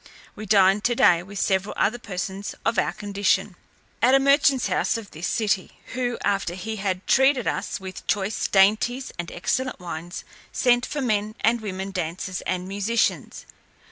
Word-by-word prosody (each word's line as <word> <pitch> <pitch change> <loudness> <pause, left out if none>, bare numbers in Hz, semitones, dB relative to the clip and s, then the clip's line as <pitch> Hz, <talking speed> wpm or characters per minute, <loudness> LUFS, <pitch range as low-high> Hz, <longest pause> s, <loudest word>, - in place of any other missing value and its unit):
We 215 0 -8
dined 195 0 +4
today 180 -8 +4
with 195 +3 -10
several 190 +1 0
other 240 +4 +1
persons 195 -1 -5
of 225 -2 +2
our - - +1
condition, 200 -1 -1 0.5
at 255 +2 +5
a - - +6
merchant's 275 -1 +3
house - - 0
of 220 -3 -9
this 160 +4 -4
city; 200 -4 -1
who, 245 -2 -2
after 195 -3 0
he 220 +4 -5
had 190 -2 -2
treated 265 -1 +3
us - - -2
with 190 -1 -9
choice 205 +1 0
dainties 220 +6 +2
and 170 - -4
excellent 260 +8 -2
wines, 175 0 -7 0.3
sent 245 0 +2
for 295 - -3
men 215 -3 -1
and 230 +1 +2
women 195 -2 -5
dancers, 185 +1 -4
and 180 0 -2
musicians. 205 +4 -1
205 Hz, 160 wpm, -24 LUFS, 190-235 Hz, 0.5 s, a